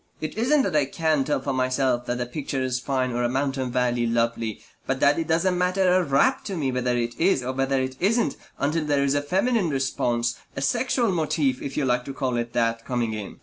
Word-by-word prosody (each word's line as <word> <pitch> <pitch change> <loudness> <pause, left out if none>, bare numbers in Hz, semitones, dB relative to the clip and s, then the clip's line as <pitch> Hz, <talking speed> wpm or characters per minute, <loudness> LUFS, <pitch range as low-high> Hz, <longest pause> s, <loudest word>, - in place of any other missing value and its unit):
It 155 - -5
isn't 265 +6 +3
that 185 -5 -1
I 150 -2 +4
can't 155 -1 0
tell 150 - +1
for 140 - -3
myself 130 -1 0
that 120 0 -2
a 120 - -1
picture 135 +2 -4
is 125 -1 -1
fine 130 -1 -1
or 120 0 -1
a 120 - +1
mountain 135 -1 -1
valley 120 -1 +1
lovely, 115 -1 -1 0.3
but 135 0 -1
that 145 +3 +4
it 165 - -2
doesn't 180 +3 +1
matter 180 0 +2
a 185 0 +3
rap 170 - +2
to 195 -3 -4
me 135 -4 0
whether 125 -1 0
it 120 0 -1
is 170 -7 +3
or 130 - -2
whether 135 0 0
it 130 0 -3
isn't 210 - +1 0.2
until 150 +3 0
there 145 -2 +2
is 140 0 +2
a 145 - +1
feminine 190 +5 +1
response, 120 -4 -1 0.2
a - - -4
sexual 240 - +1
motif, 155 -6 0
if 140 - -5
you 145 - +1
like 125 -1 +1
to 135 - -7
call 130 -3 -1
it 120 0 -3
that, 115 -1 0
coming 120 -3 -1
in. 105 -2 -6
135 Hz, 230 wpm, -24 LUFS, 125-160 Hz, 0.3 s, I